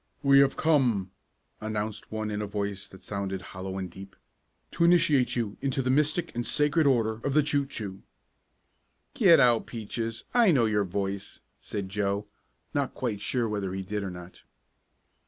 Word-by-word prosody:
"We 140 0 +6
have 140 -1 +3
come," 125 - +2 0.5
announced 110 -1 -4
one 110 -1 -3
in 105 0 -2
a 105 - -3
voice 100 -1 -4
that 95 - -14
sounded 100 -2 -3
hollow 95 +1 -5
and 95 -1 -3
deep, 95 +2 -12 0.6
"to - - 0
initiate 170 -7 +4
you 115 -4 -2
into 135 -1 0
the 130 - +1
Mystic 155 +5 +1
and 120 - -2
Sacred 150 +4 +3
Order 115 -4 +1
of 140 0 -1
the 150 - +5
Choo 145 -1 0
Choo!" 100 -8 -6 1.1
"Get 175 - +6
out, 120 -3 +4
Peaches, 115 0 -4
I 235 -3 +5
know 130 -9 +4
your 105 -2 +1
voice," 95 +1 -4 0.2
said 100 -2 -5
Joe, 100 +1 -1 0.5
not 140 -3 -1
quite 110 -6 -3
sure 120 0 0
whether 100 -3 -3
he 95 - -3
did 105 +2 -3
or 100 - -4
not. 90 0 -11
110 Hz, 170 wpm, -28 LUFS, 100-140 Hz, 1.1 s, We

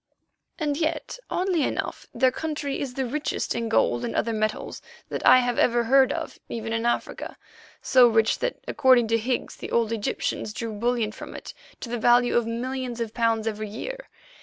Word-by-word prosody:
And 295 -4 -1
yet, 320 +9 -2
oddly 365 -3 0
enough, - - -3
their 255 +2 +3
country 295 -1 -3
is 260 -3 -4
the 265 - -1
richest 295 +5 -2
in 230 -1 -2
gold 120 - +2
and 115 -1 -3
other 230 - 0
metals 215 0 -2 0.3
that - - -4
I - - +9
have 245 -1 -1
ever 240 -1 +3
heard 265 +3 +5
of - - -5
even 225 -1 -4
in 225 +1 0
Africa—so 245 +1 0
rich 225 -1 +2
that, - - -2
according 255 -5 +4
to 230 - +3
Higgs, 245 +2 -2
the - - -7
old 230 -1 +1
Egyptians 215 -1 -2
drew 225 0 -4
bullion 230 0 0
from - - -9
it - - -8 0.3
to 240 - -6
the 240 - -2
value 240 +2 +4
of 240 -1 +2
millions 250 +1 -3
of 225 -2 -3
pounds 230 -2 +1
every 215 -1 -3
year. - - -7
240 Hz, 185 wpm, -25 LUFS, 225-265 Hz, 0.3 s, I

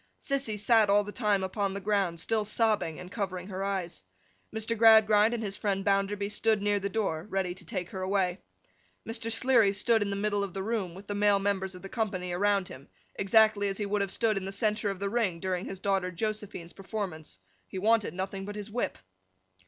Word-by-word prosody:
Sissy 275 -6 -2
sat 215 0 +4
all 205 +1 +5
the 205 - -7
time 210 -4 +1
upon 195 +1 -1
the - - -3
ground, 195 -4 0
still 220 +5 +1
sobbing, 210 -6 +1
and 180 0 -9
covering 190 -3 -4
her 190 0 -4
eyes. 185 - -3 0.5
Mr. 220 +1 -1
Gradgrind 220 -1 +6
and 225 - -4
his 200 -2 -3
friend 195 -2 -1
Bounderby 200 0 +1
stood 215 +1 +1
near 205 0 +1
the 200 0 -2
door, 195 -5 -2
ready 190 -3 -1
to 185 - -12
take 185 -6 -5
her 190 - -5
away. 185 -1 0 0.7
Mr. 225 0 -2
Sleary 230 -3 +4
stood 220 +3 +2
in 205 - 0
the 200 - -2
middle 205 0 0
of 195 -2 -6
the 190 - -2
room, 200 -5 -2
with 195 +2 -11
the 205 - -4
male 205 0 +4
members 195 -1 -1
of 180 - -12
the - - -6
company 195 -5 -2
about 200 +1 +1
him, 135 +2 -11 0.3
exactly 215 0 +4
as 195 -1 -2
he 210 - -2
would 205 0 0
have 200 - -1
stood 215 +1 +1
in 190 - -3
the 195 - -4
centre 210 +1 0
of 195 - -3
the 200 - -1
ring 200 -6 0
during 185 +1 -2
his 195 - -5
daughter 190 -1 0
Josephine's 205 -2 -4
performance. 190 - -5 0.3
He - - -7
wanted 210 -3 +2
nothing 190 +1 -4
but 205 +1 -6
his 210 0 -7
whip. 240 +2 -2
200 Hz, 215 wpm, -29 LUFS, 190-215 Hz, 0.7 s, Gradgrind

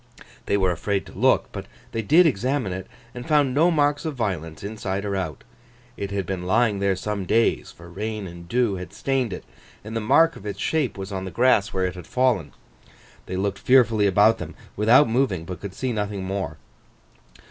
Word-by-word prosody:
They 100 - +2
were 95 -2 +2
afraid 95 +3 -2
to - - -12
look; 130 +7 +2
but 95 -1 -7 0.2
they 115 -1 -2
did 160 - +5
examine 130 - 0
it, 95 0 -6 0.3
and 125 +3 -8
found 145 -4 +3
no 160 +6 +4
mark 145 -3 +1
of 160 -3 -3
violence, 90 - -3
inside 100 -1 -4
or 100 -1 -2
out. 90 -7 -4 0.5
It 100 - -4
had 100 -2 -2
been 90 0 -4
lying 110 0 +2
there 100 -1 +1
some 100 +1 -3
days, 115 +5 +1
for 85 - -14
rain 105 +4 -4
and 85 -1 -10
dew 120 -4 +1
had 90 - -8
stained 135 -4 -1
it, 90 - -6 0.4
and 110 +2 -7
the 115 - -1
mark 160 +9 +4
of - - -12
its 100 -1 -5
shape 145 -6 0
was 95 +1 -6
on 95 -1 -4
the - - -4
grass 120 -3 +3
where 95 -1 0
it 90 - -2
had 90 -3 -10
fallen. 120 - +1 0.8
They 95 - -4
looked 100 0 -1
fearfully 115 -5 +4
about 105 +3 +4
them, - - -7 0.2
without 120 +7 +5
moving, 110 -8 0
but 90 -1 -7
could 100 -2 -7
see 130 +2 -2
nothing 105 -2 -3
more. 95 0 -3
105 Hz, 200 wpm, -24 LUFS, 95-125 Hz, 0.8 s, did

